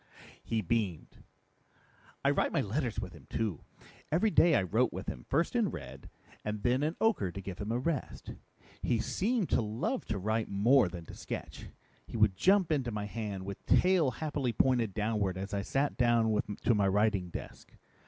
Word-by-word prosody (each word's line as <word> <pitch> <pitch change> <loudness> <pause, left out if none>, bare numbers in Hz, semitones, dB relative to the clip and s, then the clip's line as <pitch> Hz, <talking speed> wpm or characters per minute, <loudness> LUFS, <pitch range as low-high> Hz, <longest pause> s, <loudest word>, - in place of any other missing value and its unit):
He 115 -1 -1
beamed. 100 -4 -2 1.1
"I - - +5
write - - +1
my - - +1
letters 120 +3 -2
with 90 - -6
him 80 -5 -15
too. 105 -9 -2 0.5
Every 185 +8 +3
day 170 -5 +5
I - - +3
wrote 90 - +1
with - - -6
him, - - -6
first 165 - +1
in 230 -5 +2
red, - - -9 0.3
and 105 -1 -4
then 125 +2 +2
in 155 +3 0
ochre 205 - +2
to 95 - -7
give 95 -2 -7
him 105 +2 -3
a 120 - +1
rest. 140 +3 -3 0.5
He 120 - +1
seemed 195 - 0
to - - +3
love 115 - -2
to 110 - -2
write 110 +3 -1
more 105 +2 +4
than 85 -2 -8
to - - -11
sketch. - - -7 0.4
He - - -5
would 105 -3 +4
jump 190 - +3
into 135 -5 +1
my 105 -2 -3
hand 105 -3 -5
with 100 0 -7
tail 180 -6 +4
happily 140 -1 -2
pointed 120 -4 +2
downward 105 -4 0
as 100 +2 -5
I 100 - 0
sat 135 +7 -1
down 115 -3 +3 0.2
to 120 - +4
my 100 -2 +2
writing 100 -2 +2
desk. - - -9
110 Hz, 185 wpm, -31 LUFS, 100-140 Hz, 1.1 s, I